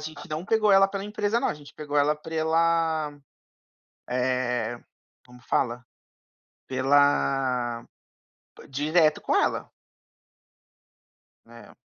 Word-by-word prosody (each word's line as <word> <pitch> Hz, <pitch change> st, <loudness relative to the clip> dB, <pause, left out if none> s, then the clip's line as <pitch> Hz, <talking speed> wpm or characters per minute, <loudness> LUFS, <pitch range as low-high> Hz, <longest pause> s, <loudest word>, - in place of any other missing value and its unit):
gente 155 Hz, +3 st, -9 dB
não 155 Hz, +2 st, -4 dB
pegou 215 Hz, -1 st, +3 dB
ela 195 Hz, 0 st, +6 dB
pela 195 Hz, 0 st, -5 dB
empresa, 210 Hz, +1 st, -1 dB
não. -, -, 0 dB
A -, -, -2 dB
gente 145 Hz, -1 st, -14 dB
pegou 150 Hz, -1 st, -5 dB
ela 145 Hz, +1 st, +3 dB
pela, 160 Hz, 0 st, 0 dB, 1.0 s
eh, 125 Hz, -2 st, -1 dB, 0.5 s
como 125 Hz, 0 st, -16 dB
fala? 120 Hz, -1 st, -1 dB, 0.8 s
Pela 130 Hz, -3 st, +1 dB, 0.8 s
direto 155 Hz, +3 st, +2 dB
com -, -, -1 dB
ela. -, -, 0 dB, 1.8 s
É. 115 Hz, 0 st, -15 dB
150 Hz, 100 wpm, -26 LUFS, 130-165 Hz, 1.8 s, ela